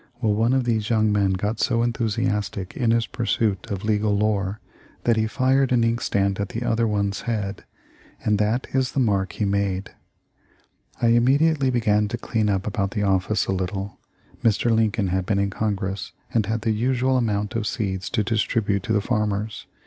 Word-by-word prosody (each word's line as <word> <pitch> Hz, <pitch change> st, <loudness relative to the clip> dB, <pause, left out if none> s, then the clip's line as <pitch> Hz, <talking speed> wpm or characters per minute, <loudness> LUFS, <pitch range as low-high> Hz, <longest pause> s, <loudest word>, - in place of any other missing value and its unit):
'Well, 110 Hz, -4 st, +1 dB
one 115 Hz, +4 st, +2 dB
of 130 Hz, -1 st, +2 dB
these 110 Hz, -3 st, 0 dB
young 110 Hz, -2 st, +3 dB
men 100 Hz, -2 st, +2 dB
got 105 Hz, +4 st, -2 dB
so 115 Hz, -2 st, +2 dB
enthusiastic 105 Hz, -5 st, -1 dB
in 120 Hz, -3 st, 0 dB
his 115 Hz, 0 st, +3 dB
pursuit 110 Hz, -3 st, -1 dB
of 100 Hz, -2 st, -4 dB
legal 105 Hz, -1 st, +1 dB
lore 105 Hz, -1 st, 0 dB, 0.4 s
that 115 Hz, -, +3 dB
he 110 Hz, 0 st, +1 dB
fired 130 Hz, +2 st, +2 dB
an 120 Hz, -2 st, +3 dB
inkstand 100 Hz, -4 st, 0 dB
at 100 Hz, -, -2 dB
the 115 Hz, -, -4 dB
other 115 Hz, -1 st, +1 dB
one's 100 Hz, -2 st, -1 dB
head, 105 Hz, -3 st, -3 dB, 0.6 s
and 105 Hz, -1 st, +2 dB
that 110 Hz, +4 st, +1 dB
is 130 Hz, 0 st, +1 dB
the -, -, 0 dB
mark 100 Hz, -6 st, +1 dB
he 105 Hz, -, -1 dB
made.' 100 Hz, -1 st, -1 dB, 1.1 s
I 115 Hz, -, +3 dB
immediately 135 Hz, +4 st, +3 dB
began 105 Hz, -4 st, +2 dB
to 120 Hz, -, -3 dB
clean 110 Hz, -2 st, -1 dB
up 95 Hz, -1 st, 0 dB
about 100 Hz, -2 st, -1 dB
the 105 Hz, 0 st, -2 dB
office 95 Hz, +1 st, +1 dB
a -, -, -2 dB
little. 95 Hz, +2 st, -4 dB, 0.4 s
Mr. 115 Hz, +1 st, +2 dB
Lincoln 110 Hz, -3 st, +1 dB
had 95 Hz, 0 st, -1 dB
been 100 Hz, -, +1 dB
in 100 Hz, 0 st, 0 dB
Congress 100 Hz, -2 st, -3 dB, 0.2 s
and 110 Hz, -4 st, +1 dB
had 110 Hz, +1 st, -1 dB
the 110 Hz, -, +1 dB
usual 125 Hz, +4 st, +1 dB
amount 105 Hz, -4 st, 0 dB
of 110 Hz, -2 st, -1 dB
seeds 95 Hz, -4 st, -2 dB
to 110 Hz, -3 st, 0 dB
distribute 105 Hz, -2 st, 0 dB
to 110 Hz, +4 st, -2 dB
the 105 Hz, -, +2 dB
farmers. 105 Hz, -1 st, -2 dB
105 Hz, 185 wpm, -23 LUFS, 100-115 Hz, 1.1 s, young